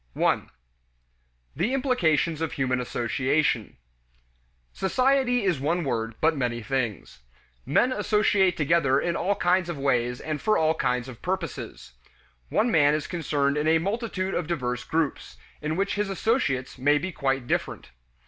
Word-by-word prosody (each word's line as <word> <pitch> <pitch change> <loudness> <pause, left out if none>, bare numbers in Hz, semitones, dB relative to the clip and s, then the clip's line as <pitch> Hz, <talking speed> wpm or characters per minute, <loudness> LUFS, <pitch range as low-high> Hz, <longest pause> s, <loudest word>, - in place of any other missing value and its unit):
1. - - +1 1.1
The 240 +7 0
Implications 170 - +1
of 165 - -2
Human 130 -2 0
Association. 125 +1 0 1.0
Society 255 +3 +2
is 180 -8 +1
one 165 +6 0
word, 115 -4 -2
but 160 +1 +3
many 120 -4 -2
things. 120 - -3 0.5
Men 240 - +3
associate 210 -4 +2
together 150 -3 +3
in 170 +2 -1
all 200 +4 0
kinds 180 -1 +1
of 170 - -4
ways 125 -3 0
and 155 -2 -4
for 215 - +2
all 160 0 +3
kinds 125 -5 -1
of 125 -3 -10
purposes. 180 - -5 0.6
One 235 +2 +1
man 145 -4 +4
is 155 - -3
concerned 145 -4 -1
in 150 +1 0
a 160 +1 +5
multitude 195 +1 -2
of 175 - -2
diverse 125 -7 -2
groups, 160 -1 -2 0.2
in 155 +1 -2
which 195 +2 0
his 205 -1 -1
associates 180 - -1
may 145 +3 +4
be 185 +6 -3
quite 135 -5 -1
different. - - -3
155 Hz, 150 wpm, -26 LUFS, 135-190 Hz, 1.1 s, a